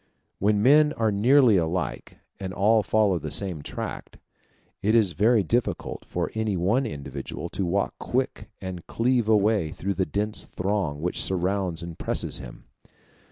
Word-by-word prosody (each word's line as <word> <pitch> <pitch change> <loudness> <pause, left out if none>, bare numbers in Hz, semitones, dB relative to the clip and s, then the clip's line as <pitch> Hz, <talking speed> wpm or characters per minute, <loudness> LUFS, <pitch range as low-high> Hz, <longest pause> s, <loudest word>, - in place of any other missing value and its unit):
When 105 +1 +2
men 150 +4 +6
are 110 -2 +1
nearly 120 +2 +5
alike, 85 +1 -2 0.2
and 95 -1 -5
all 110 +3 +4
follow 100 -3 +2
the 75 0 -5
same 80 +1 -2
track, - - -6 0.6
it 110 +3 +2
is 110 -6 +4
very 105 +5 +3
difficult 120 +6 -2
for - - -3
any 110 -3 -1
one 110 +10 +1
individual 70 - -6
to 95 - -2
walk 100 +3 0
quick 130 +2 -2
and 95 -2 -7
cleave 120 -1 +1
a 110 -1 +5
way 100 -6 +1
through 100 +5 -3
the 95 -1 -1
dense 105 +1 -1
throng 90 -6 -2
which 90 - 0
surrounds 95 -2 -1
and 85 -1 -8
presses - - -1
him. - - -10
100 Hz, 160 wpm, -25 LUFS, 90-110 Hz, 0.6 s, men